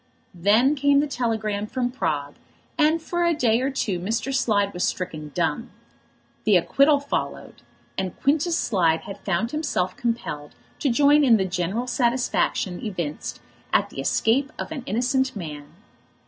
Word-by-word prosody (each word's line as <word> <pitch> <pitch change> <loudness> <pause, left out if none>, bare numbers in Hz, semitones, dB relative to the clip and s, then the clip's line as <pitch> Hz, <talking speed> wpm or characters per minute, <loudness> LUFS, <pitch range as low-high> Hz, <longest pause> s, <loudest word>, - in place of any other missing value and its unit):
Then 210 - +3
came 285 -1 +3
the 290 - +2
telegram 220 -6 -2
from 245 +1 -2
Prague, 145 - -2 0.4
and 315 +1 +3
for 345 +2 -2
a 340 -1 +2
day 235 -4 +2
or 265 - +1
two 215 -9 -2
Mr. 225 +8 -2
Slide 205 -6 +1
was 180 - -2
stricken 155 -4 -3
dumb. 180 +8 -1 0.7
The 210 -4 +5
acquittal 275 - +4
followed, 285 - -4 0.4
and 185 -2 -4
Quintus 315 +5 +2
Slide 170 -7 +2
had 200 - -9
found 195 +5 -1
himself 285 - -1
compelled 190 -11 -3 0.2
to 285 - +1
join 290 +4 +5
in 240 -5 +6
the 190 - 0
general 185 +6 -2
satisfaction 240 -7 0
evinced 170 -8 -4 0.3
at - - +2
the - - -8
escape 270 +6 +1
of - - -5
an 300 -4 -4
innocent 260 +2 0
man. 150 -6 -7
230 Hz, 150 wpm, -24 LUFS, 185-275 Hz, 0.7 s, in